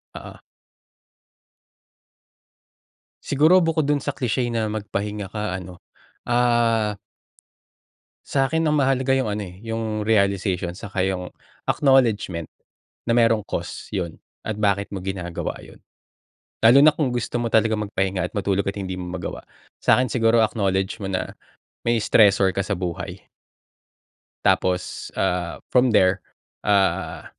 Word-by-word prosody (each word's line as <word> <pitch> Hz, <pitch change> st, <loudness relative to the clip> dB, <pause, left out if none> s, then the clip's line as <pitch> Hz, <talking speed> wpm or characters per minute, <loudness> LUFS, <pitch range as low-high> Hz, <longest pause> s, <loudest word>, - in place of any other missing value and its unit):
Oo. -, -, -9 dB, 2.9 s
Siguro 155 Hz, +6 st, +4 dB
bukod 165 Hz, -2 st, +1 dB
dun 145 Hz, -1 st, +1 dB
sa 145 Hz, -, -1 dB
cliche 125 Hz, -2 st, -1 dB
na 115 Hz, -2 st, 0 dB
magpahinga 105 Hz, -1 st, -4 dB
ka 105 Hz, -4 st, -3 dB
ano, 90 Hz, -1 st, -8 dB, 0.5 s
ah. 120 Hz, -3 st, +2 dB, 1.3 s
sa'kin 145 Hz, +4 st, +1 dB
ang 150 Hz, -, +2 dB
mahalaga 135 Hz, -2 st, +2 dB
yung 130 Hz, -4 st, +1 dB
ano, 105 Hz, 0 st, -3 dB
eh, 90 Hz, +1 st, -12 dB
yung 115 Hz, -1 st, -3 dB
realization 100 Hz, -4 st, +1 dB
saka 100 Hz, -1 st, -3 dB
yung 90 Hz, -1 st, -3 dB, 0.4 s
acknowledgement, 115 Hz, -, +2 dB, 0.6 s
na 115 Hz, -, +1 dB
merong 115 Hz, -3 st, +3 dB
cost -, -, -6 dB
yun 90 Hz, -5 st, -3 dB, 0.2 s
at 110 Hz, -2 st, -4 dB
bakit 100 Hz, -1 st, +1 dB
mo 100 Hz, -, -5 dB
ginagawa 90 Hz, -2 st, -4 dB
yun. -, -, -14 dB, 0.9 s
Lalo 120 Hz, +4 st, +8 dB
na 155 Hz, -, +8 dB
kung 150 Hz, -4 st, -1 dB
gusto 120 Hz, 0 st, -2 dB
mo 120 Hz, -, -1 dB
talagang 110 Hz, -1 st, +1 dB
magpahinga 95 Hz, -2 st, -1 dB
at -, -, -38 dB
matulog 100 Hz, -1 st, 0 dB
at 100 Hz, -, -2 dB
hindi 95 Hz, -2 st, -5 dB
mo 90 Hz, -, -5 dB
magawa. 85 Hz, -, -6 dB, 0.4 s
Sa'kin 125 Hz, -3 st, +3 dB
siguro 115 Hz, -1 st, +3 dB
acknowledge 95 Hz, -3 st, -1 dB
mo 100 Hz, -, -4 dB
na, 95 Hz, -1 st, -3 dB, 0.5 s
may 120 Hz, 0 st, +1 dB
stressor 100 Hz, -3 st, +4 dB
ka 100 Hz, -, 0 dB
sa 100 Hz, -1 st, -3 dB
buhay. 90 Hz, -2 st, -4 dB, 1.3 s
Tapos, 90 Hz, -1 st, 0 dB
ah, 90 Hz, -1 st, -1 dB, 0.2 s
from 125 Hz, 0 st, +5 dB
there, 95 Hz, -3 st, +3 dB, 0.4 s
ah, 100 Hz, -2 st, +1 dB
105 Hz, 130 wpm, -23 LUFS, 95-120 Hz, 2.9 s, Lalo